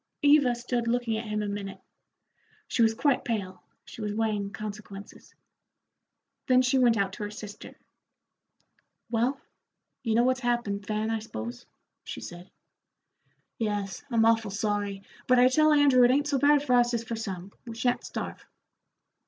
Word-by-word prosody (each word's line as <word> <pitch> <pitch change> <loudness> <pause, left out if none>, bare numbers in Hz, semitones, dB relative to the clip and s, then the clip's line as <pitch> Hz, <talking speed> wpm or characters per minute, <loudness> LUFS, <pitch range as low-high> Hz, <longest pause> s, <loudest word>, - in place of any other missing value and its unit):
Eva 285 -4 +5
stood 240 0 -2
looking 235 -1 0
at 220 +1 -4
him 210 0 -2
a - - -3
minute. 200 -1 -5 0.9
She 240 - 0
was 225 -1 +4
quite 275 +1 +1
pale, 195 -6 -3 0.2
she - - -10
was 210 -1 -3
weighing 210 -2 -1
consequences. 205 -1 -9 1.1
Then 255 0 +5
she 255 +1 +2
went 240 -3 +4
out 195 -1 0
to 210 - -6
her 205 - -3
sister. 210 0 -10 1.3
"Well, 245 +4 +1 0.6
you 225 -4 0
know 235 - +4
what's 255 +1 +2
happened, 235 -5 -1
Fan, 215 +1 -1
I 225 - 0
s'pose," 120 - -7 0.4
she - - -7
said. 175 +2 -10 1.1
"Yes, 205 -4 -2
I'm 230 -3 +3
awful 225 -2 +3
sorry, 205 -1 -2 0.2
but 255 - +5
I 250 +1 +6
tell 310 +4 +4
Andrew 285 -4 +5
it 245 - +6
ain't 285 +3 +2
so 280 -2 +1
bad 290 +1 +4
for 260 -4 0
us 240 0 +4
as 230 - -2
for 230 0 -4
some; 195 -4 -6 0.2
we 230 - -6
sha'n't 245 +1 0
starve." - - -6
225 Hz, 160 wpm, -27 LUFS, 205-250 Hz, 1.3 s, I